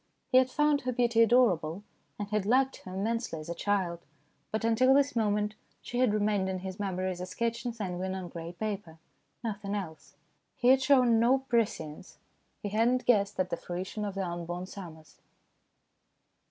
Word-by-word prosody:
He 255 - +8
had 260 0 +2
found 295 +1 +2
her 255 - -2
beauty 235 -2 +2
adorable, 205 -7 +3 0.3
and 205 - -4
had 210 -2 -1
liked 265 +3 +3
her 185 0 -9
immensely 225 -3 -2
as 155 - -9
a - - -1
child, 185 -3 -1 0.5
but 220 +1 -1
until 255 +4 +4
this 280 -1 +3
moment 210 -1 +1 0.3
she 245 - -4
had 255 -4 +4
remained 205 -2 +1
in 190 - -2
his 190 +1 -6
memory 185 -2 -1
as 180 -1 -6
a 180 - -4
sketch 235 +4 -2
in - - -1
sanguine 190 -4 -4
on 185 -2 -5
grey 165 0 -7
paper 190 -3 -5 0.5
nothing 205 -2 -3
else. 170 -6 -7 0.4
He 245 - +2
had 265 0 +6
shown 255 -4 +5
no 245 +4 +4
prescience. 225 - -2 0.5
He 205 - -2
had 225 +3 +3
not 255 0 0
guessed 205 -5 +2
at 185 0 0
the 170 - -1
fruition 185 +4 -5
of 200 -2 -4
the 195 -1 -1
unborn 175 +1 -4
summers. 160 -6 -11
205 Hz, 180 wpm, -30 LUFS, 185-235 Hz, 0.5 s, He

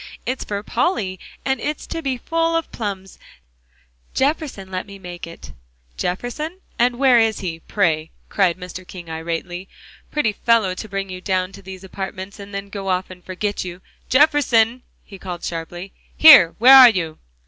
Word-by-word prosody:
It's 255 +1 -2
for 205 0 -4
Polly, 195 - -1 0.3
and 265 0 0
it's 300 +1 -3
to 330 - -5
be 270 -4 -2
full 330 +5 0
of 330 - -2
plums; 195 -4 -6 1.0
Jefferson 270 -9 -1
let 185 +2 -4
me 200 0 -10
make 175 -3 -8
it." 165 - -11 0.4
"Jefferson? 245 - -4 0.2
And 240 0 +2
where 255 -2 +5
is 225 -2 +1
he, 170 -4 -4
pray?" 160 -4 0 0.2
cried 185 -4 +1
Mr. 180 0 -8
King 175 -2 -10
irately. 170 +3 -5 0.4
"Pretty 295 -8 +1
fellow, 215 -2 +2
to 215 +4 -8
bring 195 -1 -4
you 185 0 -7
down 185 -1 -1
to - - -12
these 190 0 -10
apartments, 190 +1 -7
and 200 0 -10
then 200 0 -6
go 195 -1 -5
off 185 0 -1
and 180 -1 -13
forget 200 +2 -3
you. 180 -1 -7 0.3
Jefferson!" 255 -5 +3 0.2
he 195 -3 -12
called 180 -2 -7
sharply, 175 +3 -6 0.2
"here, 230 - +9
where 260 +4 +8
are 255 -2 +11
you?" 165 -7 -3
195 Hz, 170 wpm, -21 LUFS, 185-245 Hz, 1.0 s, are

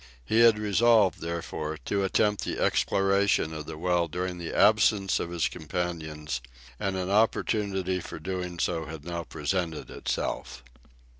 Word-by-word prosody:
He 110 - +2
had 115 -2 +7
resolved, 105 -1 +3
therefore, 80 -2 -4
to 100 -1 0
attempt 105 +2 +1
the - - -3
exploration 95 -4 +2
of 75 -1 -6
the - - -6
well 90 0 +1
during 90 +2 -4
the 85 - -5
absence 105 -3 +4
of 85 - -3
his 85 -1 0
companions, 80 -4 -4 0.4
and 95 -1 -1
an 95 0 -2
opportunity 100 -3 +1
for - - -7
doing 90 +1 -4
so 80 -1 -1
had 80 -1 -8
now 85 -1 -3
presented 80 +1 -3
itself. - - -3
90 Hz, 145 wpm, -28 LUFS, 80-100 Hz, 0.4 s, had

